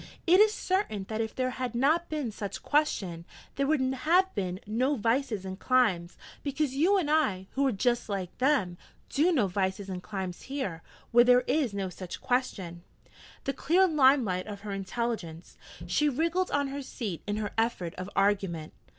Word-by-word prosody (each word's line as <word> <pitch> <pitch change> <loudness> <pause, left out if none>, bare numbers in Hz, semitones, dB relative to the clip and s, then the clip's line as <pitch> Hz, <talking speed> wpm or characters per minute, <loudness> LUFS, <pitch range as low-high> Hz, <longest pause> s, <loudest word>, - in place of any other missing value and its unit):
It 360 +3 +6
is 425 0 +6
certain 370 - -1
that 220 0 -1
if 220 -1 -4
there 255 0 0
had 255 -2 -4
been 235 - -2 0.3
no 300 -6 -2
such 200 -1 -6
question, 195 - 0 0.3
there 275 +1 0
would 310 0 +2
have 350 +8 +2
been 185 -2 -3
no 250 +7 +1
vices 230 -3 0
and 190 0 -6
climes, 200 -10 +2 0.2
because 280 -1 -1
you 345 +9 +3
and 355 -6 0
I, 255 -13 +2
who 275 0 +1
are - - +2
just 240 +2 0
like 190 -3 -3
them, 250 -11 +1 0.3
do 320 +6 +3
no 260 - +3
vices 190 +1 -2
and 180 -1 -4
climes 190 -3 -5
here, 260 -12 -4 0.3
where 240 +1 +7
there 250 0 +6
is 250 -5 0
no 195 -2 -2
such 185 -1 -7
question.' 215 -10 -2 0.6
The 275 - -1
clear 370 +6 +3
limelight 260 - +3
of 205 -1 -7
her 210 -1 -6
intelligence! 195 -4 -4 0.3
She 295 +12 +2
wriggled 335 +6 0
on 285 -1 0
her 280 +1 -4
seat 215 - -5
in 205 0 -1
her 210 -1 -3
effort 225 -7 -1
of 185 +1 -6
argument. 195 -6 0
235 Hz, 175 wpm, -29 LUFS, 190-280 Hz, 0.6 s, where